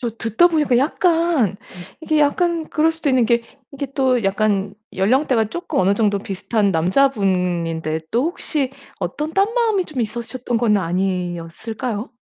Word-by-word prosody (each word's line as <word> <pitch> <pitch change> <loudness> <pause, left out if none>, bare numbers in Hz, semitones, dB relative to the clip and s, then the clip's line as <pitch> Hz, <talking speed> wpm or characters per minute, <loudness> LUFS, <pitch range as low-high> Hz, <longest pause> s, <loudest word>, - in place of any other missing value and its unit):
저 245 - -1
듣다 225 +6 +2
보니까 300 -8 +2
약간 325 - +2 0.4
이게 315 -1 0
약간 330 +2 +1
그럴 315 +1 +3
수도 320 -3 -2
있는 250 -3 +3
게 235 0 +2 0.3
이게 275 0 -4
또 255 -5 +2
약간 200 0 0 0.2
연령대가 235 +4 +2
쪼끔 345 - -3
어느 190 +1 +3
정도 205 -1 +1
비슷한 200 +1 -1
남자분인데 180 - +1
또 240 +5 +1
혹시 305 -5 -2 0.3
어떤 305 +2 -4
딴 395 +3 +2
마음이 450 -6 +1
좀 285 -7 -5
있으셨던 235 +2 -3
건 220 -3 +3
아니었을까요? 185 +5 -3
235 Hz, 310 characters per minute, -20 LUFS, 195-300 Hz, 0.4 s, 그럴